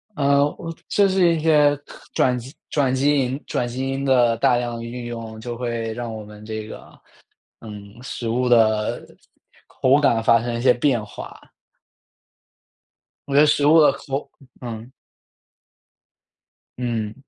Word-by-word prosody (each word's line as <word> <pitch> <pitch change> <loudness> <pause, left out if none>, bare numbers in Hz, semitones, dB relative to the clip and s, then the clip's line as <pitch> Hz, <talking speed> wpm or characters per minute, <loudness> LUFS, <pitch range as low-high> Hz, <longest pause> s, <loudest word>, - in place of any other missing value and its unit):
呃， 140 -1 +3 0.4
就 200 -1 +3
是 185 -3 +3
一 - - -2
些 150 -2 +4 0.4
转 125 -1 +2
基 125 +2 -9
因 - - -46
转 135 -3 +1
基 145 +2 +2
因 130 +3 -5
转 120 - -1
基 130 +2 -4
因 135 +1 -3
的 120 -3 +3
大 125 -1 +3
量 120 -1 -3
运 120 +1 -7
用， 115 -2 -7
就 120 +1 -6
会 115 -2 -3
让 120 -1 -5
我 110 -1 -7
们 105 0 -13
这 110 -1 -6
个， - - -12 0.6
嗯， 105 0 -11
食 120 -2 -5
物 125 +2 0
的 110 -3 +2 0.6
口 130 +2 +2
感 115 -6 +2
发 115 +1 +4
生 120 -1 -3
一 - - -3
些 125 0 +5
变 120 -4 0
化。 105 - -10 1.9
我 140 - -3
觉 140 - +5
得 - - +6
食 150 -1 +2
物 160 +2 +6
的 150 - +6
口 140 0 -5 0.3
嗯。 115 0 -7 1.9
嗯， 115 -4 -3
120 Hz, 165 characters per minute, -22 LUFS, 115-140 Hz, 1.9 s, 得